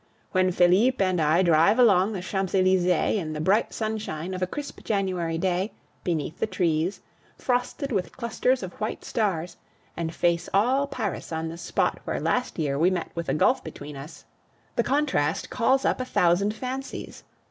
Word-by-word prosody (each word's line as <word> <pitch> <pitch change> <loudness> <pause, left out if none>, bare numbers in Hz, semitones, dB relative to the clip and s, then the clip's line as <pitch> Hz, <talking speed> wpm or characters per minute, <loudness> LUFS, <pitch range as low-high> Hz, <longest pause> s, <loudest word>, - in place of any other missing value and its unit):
When 185 -1 +3
Felipe 185 +9 +4
and 185 -3 +2
I 160 +4 +3
drive 170 +5 +4
along 210 -4 +5
the 185 -3 -4
Champs 190 0 -2
Elysees 185 -1 +3 0.3
in 155 -2 -4
the 150 - -4
bright 195 +8 +2
sunshine 210 -6 -3
of 185 - -5
a 185 - +1
crisp 290 +8 -7
January 185 -5 -1
day, 185 +3 -1 0.3
beneath 165 -2 -2
the - - 0
trees, 170 -2 0 0.4
frosted 255 +3 -1
with 195 -5 -2
clusters 250 0 0
of 185 - -6
white 215 - -3
stars, 180 -6 -1 0.4
and 165 -1 -3
face 170 0 0
all 260 +7 +3
Paris 220 -11 -4
on 160 0 -2
the 165 - -6
spot - - 0
where - - -2
last 250 0 -1
year 145 -4 -1
we 170 +3 +5
met 180 -2 -3
with 170 -1 -4
a - - +1
gulf - - +3
between 145 0 -8
us, 140 +4 -10 0.5
the - - +3
contrast 265 - 0
calls 260 +3 +2
up - - +1
a - - -2
thousand 200 -1 +2
fancies. 260 +3 -6
185 Hz, 175 wpm, -26 LUFS, 170-220 Hz, 0.5 s, along